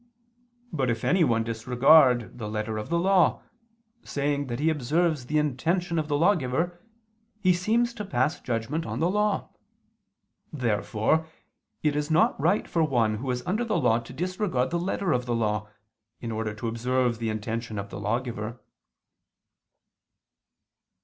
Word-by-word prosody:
But 135 -5 0
if 115 -1 -2
anyone 135 -11 +3
disregard 125 +2 +4
the 105 -2 -4
letter 110 0 -3
of 105 - -6
the 170 - +1
law, 185 0 +3 0.6
saying 145 0 -1
that 120 0 -4
he 160 +2 +2
observes 150 0 0
the 155 - 0
intention 165 +4 0
of 155 - -2
the 145 -1 +1
lawgiver, 170 0 +1 0.6
he 185 -3 +4
seems 230 +7 +1
to 225 -3 -5
pass 140 -2 0
judgment 125 +7 -2
on - - -4
the 170 +3 +2
law. 210 +1 0 1.0
Therefore 120 +3 0 0.6
it 150 -2 +2
is 150 +1 -1
not 155 -3 +3
right 180 +7 +2
for 165 - +1
one 115 -7 +1
who 130 +4 -5
is 125 0 -2
under 215 +6 0
the 220 -4 0
law 120 -6 +3
to 115 +1 -11
disregard 175 -4 -1
the 170 - 0
letter 185 0 -1
of 125 -3 0
the 120 - 0
law, 105 -2 -1 0.5
in 115 - -5
order 110 -1 -3
to 110 +2 -4
observe 120 +1 0
the 115 -1 -2
intention 110 +1 -4
of 100 0 -5
the 95 - -6
lawgiver. 115 +1 -3
130 Hz, 155 wpm, -26 LUFS, 115-170 Hz, 1.0 s, disregard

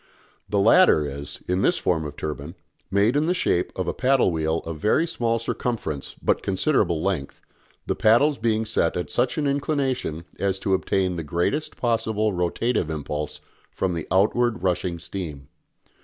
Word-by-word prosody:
The 105 - 0
latter 105 - +5
is, 70 0 -7
in 90 +1 +1
this - - +3
form 80 -4 0
of 75 - -6
turbine, 75 +2 -5 0.3
made 100 +6 +3
in 150 +2 +2
the 180 - +2
shape 90 - +1
of - - -2
a - - 0
paddle 130 -6 +3
wheel 80 0 0
of 80 -2 -5
very 110 - +3
small 115 -7 0
circumference 110 - -3
but - - +2
considerable 95 - +1
length, 90 -8 -2 0.5
the - - 0
paddles 135 +7 +4
being 110 -1 +1
set 100 -7 0
at 90 - -4
such 125 +5 0
an 150 - 0
inclination 140 - -1
as 95 -1 0
to 95 0 -1
obtain 95 -1 0
the 85 - -3
greatest 85 - -1
possible 110 -3 0
rotative 90 +2 0
impulse 75 -1 -4 0.3
from 95 -2 -2
the 85 -2 -4
outward 110 +4 +2
rushing 90 -1 0
steam. 85 -5 -7
95 Hz, 165 wpm, -24 LUFS, 85-120 Hz, 0.5 s, latter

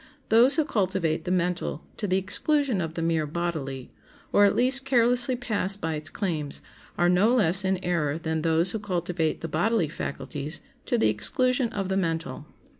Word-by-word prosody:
Those 235 +5 +5
who 315 - +1
cultivate 190 - -1
the 180 - -2
mental 175 -3 -1
to 205 - -3
the 185 0 +1
exclusion 250 +4 +1
of 160 -1 -5
the 165 - -3
mere 165 -2 0
bodily, 150 -5 -4 0.4
or 205 - +6
at 200 - +2
least 265 +2 +3
carelessly 250 -1 +4
pass 215 -5 0
by 165 -5 -4
its 155 0 -1
claims, 160 -8 -4 0.3
are 175 - +3
no 195 +7 +3
less 190 -4 +3
in 190 0 0
error 155 -4 -1
than 160 -1 -3
those 165 +2 +2
who 220 - -3
cultivate 175 -5 -2
the 165 - -4
bodily 175 +2 0
faculties 145 +1 -6 0.3
to 240 - +1
the 165 - +3
exclusion 250 - +1
of 195 -3 -4
the 190 0 -1
mental. 165 -3 -3
180 Hz, 180 wpm, -26 LUFS, 160-220 Hz, 0.4 s, or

